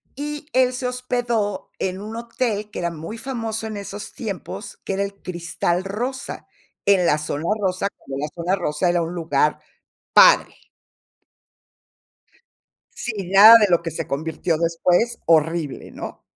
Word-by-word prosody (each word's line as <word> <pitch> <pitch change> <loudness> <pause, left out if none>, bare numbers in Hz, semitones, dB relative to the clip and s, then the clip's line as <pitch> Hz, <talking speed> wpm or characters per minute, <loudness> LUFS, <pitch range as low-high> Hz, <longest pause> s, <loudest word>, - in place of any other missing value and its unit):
Y 295 +1 -5
él 255 0 +3
se 250 0 -2
hospedó 245 -5 -2
en 190 +1 -2
un 215 +2 -7
hotel 230 -3 -3
que - - -5
era 170 -1 -1
muy 165 +8 -7
famoso 225 -4 -4
en 215 - -5
esos 200 +1 -7
tiempos, 205 -1 -6
que 195 - -3
era 195 - 0
el 200 0 -5
Cristal 175 0 -2
Rosa. 245 +8 -5 0.4
En 190 -3 +5
la 150 - +3
Zona 150 0 -4 0.2
rosa, 185 +1 0
cuando 135 0 -7
la - - -1
Zona 175 +3 0
Rosa 175 -1 0
era 175 0 +2
un 165 +1 -3
lugar 150 -3 +1 0.5
padre. - - +6 2.4
Si, 205 -6 -4
nada 215 +4 +10
de 210 - +4
lo 170 -1 +3
que 165 - -4
se 165 +1 -4
convirtió 160 +3 -1
después, 175 +7 +1
horrible, 160 -2 +1
¿no? - - -8
195 Hz, 150 wpm, -22 LUFS, 170-225 Hz, 2.4 s, nada